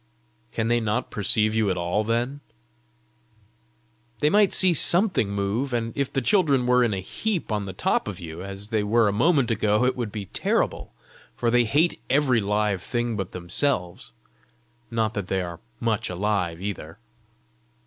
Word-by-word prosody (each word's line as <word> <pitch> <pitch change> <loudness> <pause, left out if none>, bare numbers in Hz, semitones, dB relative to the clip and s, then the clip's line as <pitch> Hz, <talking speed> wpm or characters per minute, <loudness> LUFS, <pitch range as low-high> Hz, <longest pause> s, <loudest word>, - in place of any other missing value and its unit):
"Can 110 -1 -1
they 120 0 +2
not 115 +3 -2
perceive 110 +1 +2
you 110 -2 +1
at 90 - -1
all 90 +5 0
then?" 120 +5 -1 1.8
"They 150 +7 +2
might 205 -2 +4
see 185 -2 +4
something 175 - +3
move; 100 +7 -2
and 115 -1 -2
if 140 -2 -1
the 135 - -1
children 145 - +3
were 125 0 +4
in 120 - +1
a 95 - -2
heap 185 - -3
on 105 -2 -1
the 95 - -6
top 95 - 0
of 100 -3 -5
you, 85 -1 -8
as 100 +2 -7
they 110 -2 +1
were 110 +2 +3
a 100 - +1
moment 135 +1 +2
ago, 105 +1 +2
it 130 - +1
would 120 -4 -4
be 105 -2 -5
terrible; - - -1 0.4
for 120 -1 0
they 120 0 +4
hate 150 +10 +1
every 130 -4 +3
live 105 -1 0
thing 120 +1 -2
but 95 -3 -4
themselves. 90 +1 -2 0.8
Not 110 -2 -1
that 100 -3 -4
they 95 -1 -1
are 85 -1 -7 0.2
much 115 -3 -1
alive 90 -3 -1
either!" 95 -3 -6
110 Hz, 170 wpm, -24 LUFS, 100-125 Hz, 1.8 s, might